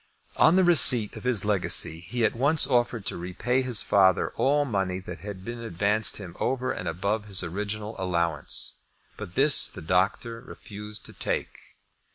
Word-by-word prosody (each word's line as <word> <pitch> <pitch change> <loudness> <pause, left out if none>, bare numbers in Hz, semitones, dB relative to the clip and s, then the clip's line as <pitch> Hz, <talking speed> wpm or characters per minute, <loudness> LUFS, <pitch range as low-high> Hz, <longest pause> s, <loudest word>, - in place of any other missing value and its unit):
On 165 - +5
the 190 - +4
receipt 135 - +6
of - - -10
his 115 -6 0
legacy 95 -5 +1
he 115 +8 -2
at 110 - 0
once 145 +6 +2
offered 120 -5 0
to - - -2
repay 95 +9 -2
his 125 -4 +2
father 95 -2 +2
all 145 +2 +1
money 95 -7 -2
that 90 -1 -9
had 95 -2 -9
been 120 0 -6
advanced 105 0 -1
him 95 -5 -10
over 130 0 -1
and - - -6
above 100 +5 -2
his 95 -3 -2
original 105 +5 -5
allowance; 85 -5 -2 0.4
but 90 - -10
this 140 +2 +4
the - - -10
doctor 95 +7 -1
refused 105 -4 -9
to - - -8
take. - - -4
105 Hz, 170 wpm, -25 LUFS, 95-125 Hz, 0.4 s, receipt